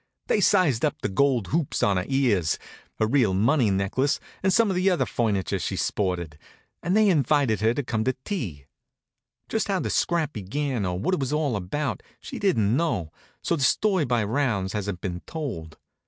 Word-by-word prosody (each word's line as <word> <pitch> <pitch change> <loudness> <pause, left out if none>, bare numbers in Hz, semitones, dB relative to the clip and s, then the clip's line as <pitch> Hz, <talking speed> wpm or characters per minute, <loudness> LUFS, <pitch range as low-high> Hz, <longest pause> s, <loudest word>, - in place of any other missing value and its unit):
They 210 - +1
sized 175 - +3
up 150 - 0
the - - 0
gold 125 +1 +1
hoops 160 -2 -1
in 100 -2 +3
her 90 - -1
ears, 120 - +1 0.4
her 110 - +2
real 115 -5 +2
money 120 +4 +3
necklace 100 +9 0 0.2
and 190 - +2
some 225 0 +3
of - - -1
the 185 +2 +3
other 180 - +1
furniture 105 -6 -1
she - - -3
sported, 85 -6 -2 0.4
and 180 +5 +1
they 215 -1 +5
invited 140 - +2
her 115 +2 +2
home 110 -2 -1
to 130 0 +1
tea. 95 - -4 0.8
Just 220 - -1
how 195 -2 0
the - - -2
scrap 170 -4 0
began 115 +2 -2
or 90 0 -2
what 105 - -1
it 185 - +1
was 135 -1 -2
all 150 -5 0
about 120 +10 -3 0.2
she - - -8
didn't 115 - +2
know, 120 - -1 0.3
so 170 - +1
the 150 - -4
story 190 +4 +2
by 120 -3 +1
rounds 105 -5 0
hasn't 100 -3 -3
been 90 -2 -4
told. 110 - -5
125 Hz, 185 wpm, -25 LUFS, 100-155 Hz, 0.8 s, they